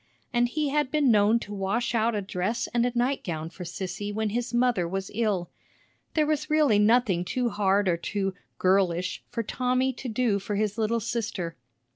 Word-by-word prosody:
And 240 0 +3
he 300 +2 -1
had 295 -1 +1
been 285 -2 +3
known 210 +1 +5
to 205 - -7
wash 205 +5 -1
out 230 0 +2
a 205 - -1
dress 190 +5 -2
and 240 0 +3
a - - -1
nightgown 180 - -1
for 180 - -8
Sissy 190 +3 -4
when 215 0 -1
his 240 +1 -2
mother 240 -7 +2
was 190 +2 -4
ill. 205 -5 0 0.6
There 310 -2 +3
was 305 0 -1
really 300 -9 +4
nothing 210 -4 +3
too 240 +7 -1
hard 200 -1 +2
or 170 -2 +2
too 195 +2 -2 0.2
"girlish" 185 -1 +1
for 235 -1 -2
Tommy 255 +3 0
to 250 +1 -6
do 220 -3 +1
for 205 +1 -4
his 210 +1 -1
little 225 +1 +1
sister. 205 -7 -3
215 Hz, 185 wpm, -27 LUFS, 195-245 Hz, 0.6 s, known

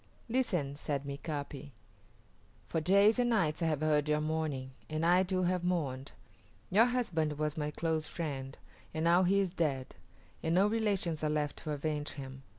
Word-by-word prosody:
"Listen!" 185 - 0
said 145 -1 -2
Mika´pi. 140 0 -5 1.0
"For 160 - -1
days 200 +7 +5
and 245 -1 +3
nights 180 -9 +1
I 165 - +2
have 155 -2 0
heard 150 -1 +2
your 150 0 +3
mourning, 155 -4 -2 0.2
and 155 +1 -1
I 180 +2 +5
too 185 0 0
have 180 0 +1
mourned. 145 -7 -2 0.6
Your 215 +5 +6
husband 165 - 0
was 150 -1 -1
my 150 -1 -2
close 160 0 -1
friend, 135 -5 -5 0.4
and 160 - -1
now 170 +2 +5
he 190 +2 +3
is 190 -3 +1
dead, 140 -7 -1 0.5
and 160 +1 0
no 190 +2 +5
relations 200 -7 0
are 155 - +2
left 150 -1 -1
to 155 - -5
avenge 150 0 -2
him. 135 -1 -8
155 Hz, 170 wpm, -32 LUFS, 145-180 Hz, 1.0 s, Your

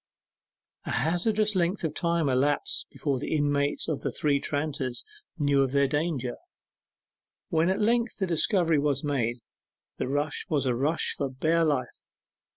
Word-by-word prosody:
A - - -5
hazardous 210 - +1
length 180 +1 0
of 160 -2 -1
time 170 -2 +1
elapsed 135 +3 0
before 140 -4 -2
the 145 - -2
inmates 145 -1 +1
of 155 -4 -2
the - - -1
Three 145 -2 +1
Tranters 145 -4 -2 0.3
knew 145 -3 +3
of 135 -1 0
their 140 0 +4
danger. 145 -4 -1 1.1
When 165 +2 +2
at 190 - +1
length 235 +2 +1
the 195 - 0
discovery 170 -2 +2
was 140 -2 0
made, 120 -5 -1 0.6
the - - -1
rush 145 +2 -2
was 145 -4 +1
a 125 - +2
rush 145 +7 0
for 140 -2 -2
bare 160 +6 +1
life. 140 -6 -1
145 Hz, 155 wpm, -27 LUFS, 140-170 Hz, 1.1 s, their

